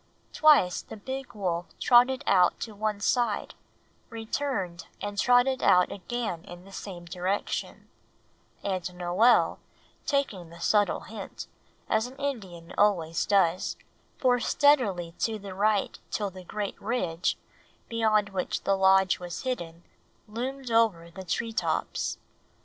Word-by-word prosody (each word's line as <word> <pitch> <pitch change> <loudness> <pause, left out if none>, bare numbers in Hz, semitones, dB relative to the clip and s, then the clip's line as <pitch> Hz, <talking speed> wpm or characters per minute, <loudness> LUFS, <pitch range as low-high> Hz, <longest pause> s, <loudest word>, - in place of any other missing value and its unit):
Twice 290 - +5
the - - -10
big 265 +4 -6
wolf 175 -4 -2
trotted 255 +3 +5
out 180 -2 +4
to 220 - -5
one 210 0 -2
side, 235 -2 0 0.6
returned 225 -6 -3
and 205 0 -4
trotted 250 +2 +4
out 180 0 +4
again 200 -4 -4
in 175 +1 -11
the 195 - -14
same 180 -3 -8
direction; 180 +3 -3 0.8
and 185 -2 -3
Noel, 180 +7 +3 0.5
taking 215 - -1
the 170 +1 -13
subtle 205 +3 +2
hint, - - -8 0.4
as 220 +1 +1
an 255 - -12
Indian 195 -12 -5
always 170 -6 +2
does, 185 -3 +2 0.4
bore 250 -2 +3
steadily 210 - +2
to 225 -1 0
the 200 -2 -8
right 205 +1 +1
till 205 -2 -2
the 185 0 -11
great 205 +2 -5
ridge, 180 -7 -1 0.5
beyond 215 -3 +2
which 190 -2 -3
the 195 - +2
Lodge 190 -1 +4
was 175 -1 -6
hidden, 175 -10 -4 0.4
loomed 250 +3 -5
over 205 -8 +2
the 190 +2 -8
tree 225 +5 -2
tops. - - -1
205 Hz, 130 wpm, -28 LUFS, 180-240 Hz, 0.8 s, Twice